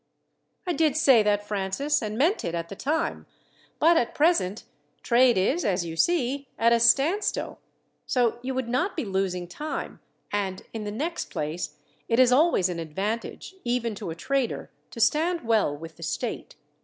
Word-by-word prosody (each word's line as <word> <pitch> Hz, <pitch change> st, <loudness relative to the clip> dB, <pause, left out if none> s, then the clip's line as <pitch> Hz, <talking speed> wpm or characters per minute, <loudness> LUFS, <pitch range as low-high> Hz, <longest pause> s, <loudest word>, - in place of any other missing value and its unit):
"I 355 Hz, -, 0 dB
did 310 Hz, -2 st, +2 dB
say 265 Hz, -7 st, +6 dB
that, 205 Hz, 0 st, +1 dB
Francis, 205 Hz, +9 st, -1 dB
and 215 Hz, -1 st, -4 dB
meant 330 Hz, -, +2 dB
it 170 Hz, 0 st, -2 dB
at 170 Hz, 0 st, -4 dB
the 195 Hz, -, -7 dB
time; 320 Hz, -, -2 dB, 0.5 s
but 330 Hz, +2 st, +5 dB
at 235 Hz, -, 0 dB
present 295 Hz, -, +2 dB, 0.4 s
trade 240 Hz, -2 st, +4 dB
is, 265 Hz, -, +1 dB
as 180 Hz, -3 st, 0 dB
you 165 Hz, -1 st, -5 dB
see, 275 Hz, -, +1 dB
at 230 Hz, +1 st, +4 dB
a 235 Hz, -, +4 dB
standstill, 275 Hz, -, +2 dB, 0.5 s
so 240 Hz, -2 st, +1 dB
you 260 Hz, +1 st, -4 dB
would 260 Hz, -2 st, -2 dB
not 255 Hz, +12 st, 0 dB
be 310 Hz, -, -1 dB
losing 190 Hz, -2 st, -2 dB
time, 300 Hz, -, -5 dB, 0.3 s
and, 195 Hz, -2 st, -2 dB
in 220 Hz, -2 st, -5 dB
the 205 Hz, -, -3 dB
next 310 Hz, +11 st, -3 dB
place, 155 Hz, 0 st, -4 dB, 0.3 s
it 230 Hz, -, +2 dB
is 255 Hz, -1 st, +6 dB
always 270 Hz, -, +4 dB
an 175 Hz, -2 st, -4 dB
advantage, 200 Hz, -, -4 dB
even 240 Hz, -2 st, -1 dB
to 195 Hz, -, -6 dB
a 160 Hz, -, -5 dB
trader, 265 Hz, +7 st, -2 dB, 0.2 s
to -, -, -10 dB
stand 320 Hz, +9 st, +2 dB
well 220 Hz, -10 st, +1 dB
with 165 Hz, +1 st, -10 dB
the -, -, -15 dB
state. 150 Hz, -, -4 dB
235 Hz, 175 wpm, -26 LUFS, 190-285 Hz, 0.5 s, say